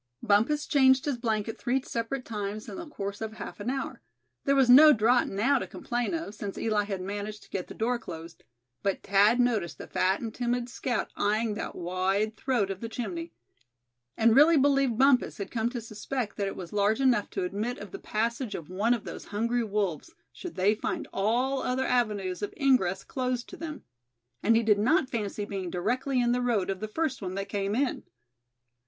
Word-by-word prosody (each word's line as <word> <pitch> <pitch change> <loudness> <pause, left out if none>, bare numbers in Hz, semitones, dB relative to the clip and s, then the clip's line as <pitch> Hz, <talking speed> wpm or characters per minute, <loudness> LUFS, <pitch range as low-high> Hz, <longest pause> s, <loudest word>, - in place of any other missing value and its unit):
Bumpus 235 +8 +3
changed 265 -2 +4
his 280 -5 -1
blanket 225 -2 -2
three 255 +2 +1
separate 245 +3 -3
times 210 0 -4
in - - -7
the 340 -1 -7
course 200 -7 -5
of 220 -1 -4
half 220 - -8
an 205 - -3
hour. 270 +1 -3 0.4
There 275 - +3
was 270 -2 +5
no 300 +5 +9
draught 235 +2 +3
now 255 +8 +2
to - - -5
complain 240 +5 -2
of, 325 -11 -5
since 205 -2 -6
Eli 215 -2 +1
had 195 -2 -4
managed 205 +2 -5
to - - -21
get 185 - -3
the - - -10
door 240 +2 0
closed; 165 -6 -9 0.4
but 195 -1 -1
Thad 205 +4 +4
noticed 215 - +1
the - - -8
fat 190 +2 +1
and 225 -2 -5
timid 245 0 -1
scout 245 -1 -2
eying 215 +1 +1
that 210 - -5
wide 190 +5 0
throat 225 -6 0
of 195 - -6
the 230 - -4
chimney; 180 -8 -5 0.9
and 225 0 +5
really 310 +3 +7
believed 275 -4 +3
Bumpus 265 -1 +4
had 200 - -5
come 230 -1 0
to 245 0 -4
suspect 225 +1 -4
that 200 -1 -1
it 195 - -4
was 180 -1 -8
large 210 +2 +2
enough 250 -6 +2
to - - -3
admit 210 +7 -2
of 205 -2 -9
the - - -7
passage 230 +2 -2
of 165 +1 -8
one 215 +6 +2
of 230 - -7
those - - -8
hungry 235 +4 0
wolves, 205 - -2 0.2
should 360 - -8
they 195 +3 +3
find 215 - -3
all 245 +7 +1
other 260 +1 0
avenues 210 -8 0
of 205 - -4
ingress 220 -10 +2
closed 255 -2 -2
to - - -8
them. 310 -1 -7 0.6
And 225 +2 +4
he 230 - +3
did 210 -2 +4
not 270 - +2
fancy 210 -3 -2
being 195 -3 -4
directly 255 +9 0
in 240 -1 +2
the 250 +1 +1
road 220 -6 +1
of 190 - -4
the 215 - -4
first 270 +2 -2
one 185 -1 -4
that 195 0 -4
came 200 +1 -1
in. 265 +1 0
225 Hz, 205 wpm, -28 LUFS, 200-250 Hz, 0.9 s, no